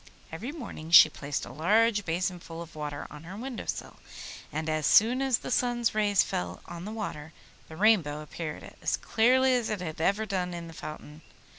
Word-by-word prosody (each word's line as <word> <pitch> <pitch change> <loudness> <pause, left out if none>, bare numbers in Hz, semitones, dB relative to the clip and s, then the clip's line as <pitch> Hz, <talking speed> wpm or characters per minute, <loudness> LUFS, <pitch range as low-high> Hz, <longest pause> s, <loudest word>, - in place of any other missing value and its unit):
Every 215 - -5
morning 235 - -8
she 165 -2 +10
placed 145 -1 -4
a - - -10
large 205 - +2
basin 180 +2 -1
full 165 0 -8
of 170 - -15
water 150 -1 -5
on 150 - -10
her 185 +4 -8
window 250 +1 -6
sill, - - -5 0.5
and 155 0 -3
as 155 -2 0
soon 240 +5 +5
as 265 -3 +2
the - - -7
sun's 240 -2 +1
rays 210 -2 +3
fell 90 0 -4
on 170 +1 -8
the 210 - -5
water 160 -8 -6 0.3
the 160 - -11
Rainbow 180 -9 +3
appeared 155 0 -7
as - - 0
clearly 255 +3 +3
as 245 -2 0
it 215 -2 -2
had 160 -3 -5
ever 200 +5 +2
done 180 -4 -2
in 170 -1 -7
the 165 - -10
fountain. 155 0 -9
180 Hz, 195 wpm, -28 LUFS, 155-225 Hz, 0.5 s, she